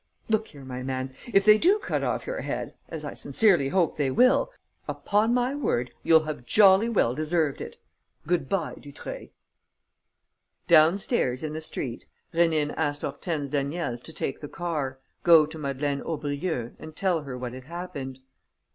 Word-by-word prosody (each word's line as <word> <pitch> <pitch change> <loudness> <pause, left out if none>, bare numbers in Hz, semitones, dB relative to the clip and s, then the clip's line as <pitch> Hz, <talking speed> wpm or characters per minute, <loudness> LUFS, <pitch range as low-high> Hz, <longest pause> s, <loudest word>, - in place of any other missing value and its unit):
Look 220 0 +1
here, 140 -3 -13
my 130 -1 -6
man, 130 0 -3 0.2
if 195 -2 +4
they 215 0 +7
do 380 - +5
cut - - -2
off - - -1
your - - -3
head - - -4 0.2
as - - -6
I - - -5
sincerely 180 -11 +2
hope 175 +1 +1
they 145 -3 +1
will 255 - +4 0.4
upon 210 +3 +1
my 250 +2 +1
word, 125 - -1
you'll 160 -1 +5
have 155 -5 -5
jolly 195 - +5
well 190 - +2
deserved 155 0 0
it! - - -7 0.5
Good 165 -4 0
bye, 190 -5 -1
Dutreuil!" 145 -1 -8 1.4
Downstairs, 160 - +3
in 155 -1 -3
the 160 - -4
street, 130 -6 -5 0.3
Rénine 160 -3 +2
asked 145 -2 -1
Hortense 145 0 -3
Daniel 145 -1 -1
to 120 - -7
take 135 - -4
the 145 - -8
car, 150 -6 -3 0.2
go 165 -3 +7
to 155 +1 -9
Madeleine 140 0 -2
Aubrieux 145 -4 -3
and 155 0 -10
tell 180 -3 +1
her 135 -3 -6
what 125 -1 -5
had 130 0 -9
happened. 140 -6 -6
155 Hz, 165 wpm, -26 LUFS, 135-180 Hz, 1.4 s, they